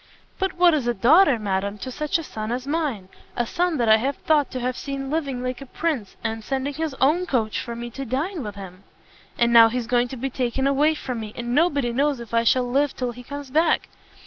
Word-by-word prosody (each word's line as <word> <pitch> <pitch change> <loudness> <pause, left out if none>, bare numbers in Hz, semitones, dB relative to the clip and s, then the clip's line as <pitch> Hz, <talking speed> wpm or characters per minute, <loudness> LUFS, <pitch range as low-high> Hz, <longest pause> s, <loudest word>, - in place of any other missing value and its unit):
"But 385 -1 0
what 350 -1 +5
is 280 -6 0
a 240 - +1
daughter, 280 - +5
madam, 200 -1 -2
to 255 +5 -6
such 300 +5 -1
a 330 - -5
son 215 -6 -5
as 250 +1 -3
mine? 280 - -2 0.3
a 240 - +1
son 350 +3 0
that 235 -3 +1
I 220 +5 +4
thought 295 0 +1
to 255 - -5
have 250 0 -2
seen 275 0 -5
living 275 -6 -2
like 255 0 -4
a 275 - -9
prince, 275 - -3
and 225 -1 -3
sending 270 +3 -2
his 310 -1 -3
own 325 +7 +2
coach 225 -5 0
for 235 -1 -5
me 240 0 -6
to 270 +4 -6
dine 290 - -2
with 210 -4 -6
him! 190 -1 -10 0.5
And 235 0 +3
now 230 -1 +9
he's 245 0 -2
going 245 +1 +2
to 260 - -8
be 265 +3 -3
taken 255 +1 -1
away 290 +3 +3
from 250 -5 -5
me, 215 -1 -7
and 240 0 -4
nobody 285 -6 +2
knows 280 +1 +1
if 235 -1 -10
I 230 0 +3
shall 250 +2 +3
live 275 +3 +1
till 250 -1 -2
he 245 +1 -11
comes 285 +1 -8
back. 320 +3 +2
255 Hz, 235 wpm, -23 LUFS, 235-290 Hz, 0.5 s, now